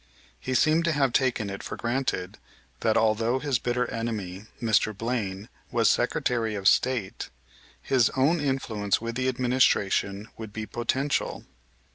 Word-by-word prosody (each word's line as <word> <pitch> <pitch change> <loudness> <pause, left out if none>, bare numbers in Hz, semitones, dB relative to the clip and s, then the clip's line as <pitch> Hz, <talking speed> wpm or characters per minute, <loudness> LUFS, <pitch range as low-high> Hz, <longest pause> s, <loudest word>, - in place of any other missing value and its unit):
He 130 - -3
seemed 155 +6 +4
to 170 - +2
have 135 -4 +1
taken 120 -6 +1
it 100 - -6
for - - -6
granted, 120 -7 -2 0.4
that, 110 -1 +2
although 115 +3 +2
his 135 -3 0
bitter 125 +1 0
enemy, 105 -4 -4
Mr. 110 -2 +1
Blaine, 110 -4 -3 0.2
was - - +3
Secretary 115 -3 0
of 95 -1 0
State, 120 -7 +1 0.5
his 125 -4 +2
own 150 +6 +3
influence 115 -8 0
with 115 +1 -4
the 130 +2 -1
administration 120 -5 +1
would 110 -2 -7
be 110 +1 -5
potential. 130 +5 -1
115 Hz, 140 wpm, -26 LUFS, 105-130 Hz, 0.5 s, seemed